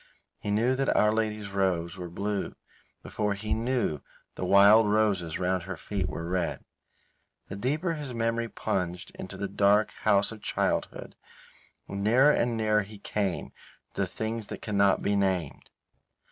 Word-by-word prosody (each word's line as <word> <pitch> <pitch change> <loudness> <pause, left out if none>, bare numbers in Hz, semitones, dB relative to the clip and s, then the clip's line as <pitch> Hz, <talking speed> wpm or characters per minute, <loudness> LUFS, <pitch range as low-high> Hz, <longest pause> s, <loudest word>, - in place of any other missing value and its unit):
He - - -5
knew 115 +5 +2
that 135 - +1
Our 105 0 +4
Lady's 105 -2 -2
robes 90 -3 0
were 90 -2 -7
blue 100 +3 -3 0.5
before 105 -1 -1
he 105 +2 -3
knew 115 - 0 0.3
the - - -6
wild 100 +3 +7
roses 100 -6 +1
round 90 0 0
her 95 0 -6
feet 100 +2 -3
were 85 0 -5
red. 90 -1 -2 0.8
The 95 - -5
deeper 150 - -1
his 150 -4 -5
memory 115 0 -1
plunged 90 -3 -3
into - - -8
the 100 - -2
dark 100 +2 +3
house 105 -1 +3
of 110 -2 -10
childhood - - -2 0.7
the - - -9
nearer 120 +9 +4
and 120 -4 +1
nearer 110 -1 +2
he 105 +2 -10
came 100 -2 -2 0.4
to - - -2
the - - +1
things 110 -1 -4
that - - -8
cannot 100 -2 +2
be 100 - +1
named. 95 -6 -1
105 Hz, 160 wpm, -28 LUFS, 95-110 Hz, 0.8 s, wild